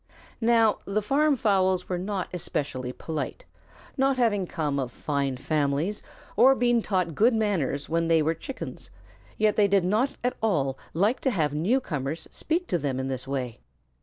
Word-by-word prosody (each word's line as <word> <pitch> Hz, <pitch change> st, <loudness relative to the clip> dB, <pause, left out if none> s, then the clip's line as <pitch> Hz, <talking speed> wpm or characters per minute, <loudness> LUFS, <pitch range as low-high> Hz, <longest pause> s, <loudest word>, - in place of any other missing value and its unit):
Now 225 Hz, -1 st, +4 dB
the 200 Hz, +2 st, 0 dB
farm 280 Hz, +7 st, +2 dB
fowls 190 Hz, -5 st, +2 dB
were 180 Hz, -1 st, -2 dB
not 195 Hz, 0 st, -3 dB
especially 135 Hz, -7 st, -3 dB
polite, 160 Hz, -, -5 dB, 0.5 s
not 270 Hz, 0 st, +2 dB
having 205 Hz, -6 st, +2 dB
come 150 Hz, -4 st, -2 dB
of 130 Hz, -2 st, -3 dB
fine 140 Hz, 0 st, -2 dB
families 150 Hz, +7 st, 0 dB, 0.3 s
or 260 Hz, +5 st, +6 dB
been 240 Hz, -2 st, +2 dB
taught 185 Hz, -6 st, -1 dB
good 225 Hz, -, +4 dB
manners 185 Hz, -11 st, 0 dB
when 165 Hz, +1 st, 0 dB
they 165 Hz, -1 st, +4 dB
were 160 Hz, +2 st, +1 dB
Chickens, 255 Hz, -, -8 dB, 0.5 s
yet 215 Hz, -1 st, +2 dB
they 205 Hz, -1 st, +5 dB
did 195 Hz, -2 st, +3 dB
not 220 Hz, +9 st, +1 dB
at 250 Hz, -, 0 dB
all 145 Hz, -12 st, +1 dB, 0.2 s
like 205 Hz, +9 st, +2 dB
to 265 Hz, -, +1 dB
have 155 Hz, -, 0 dB
newcomers 160 Hz, -, -1 dB
speak 340 Hz, +3 st, -2 dB
to 175 Hz, -, +1 dB
them 135 Hz, -3 st, -2 dB
in 130 Hz, 0 st, -2 dB
this 130 Hz, -1 st, -4 dB
way. 125 Hz, -4 st, -3 dB
185 Hz, 165 wpm, -26 LUFS, 145-225 Hz, 0.5 s, or